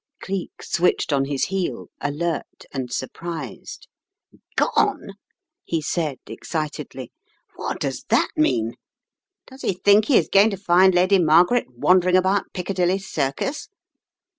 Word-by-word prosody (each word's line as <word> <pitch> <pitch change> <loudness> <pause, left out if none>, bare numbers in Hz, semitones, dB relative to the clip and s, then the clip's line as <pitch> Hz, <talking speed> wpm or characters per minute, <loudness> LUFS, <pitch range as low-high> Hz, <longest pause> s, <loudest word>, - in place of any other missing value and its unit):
Cleek 190 -1 -5
switched 170 -3 +1
on 135 -1 +2
his 140 -1 -1
heel, 190 -1 -3
alert 155 +3 -3
and 130 -3 -4
surprised. 165 +5 -6 0.4
" - - -30
Gone! - - +1 0.3
" - - -64
he 165 - -1
said 155 -3 -2
excitedly 155 -2 -5 0.4
"What - - -4
does - - -3
that - - +3
mean? 120 - +1 0.7
Does 265 +1 -14
he - - 0
think 205 +3 +4
he 270 - +4
is - - +2
going 200 +3 +5
to 200 - -4
find 185 0 +4
Lady 185 +2 +4
Margaret 175 +8 +4
wan 145 +10 +3
dering 180 0 +1
about 190 +2 +1
Piccadilly 180 0 0
Circus? 195 - -3
180 Hz, 140 wpm, -22 LUFS, 150-195 Hz, 0.7 s, going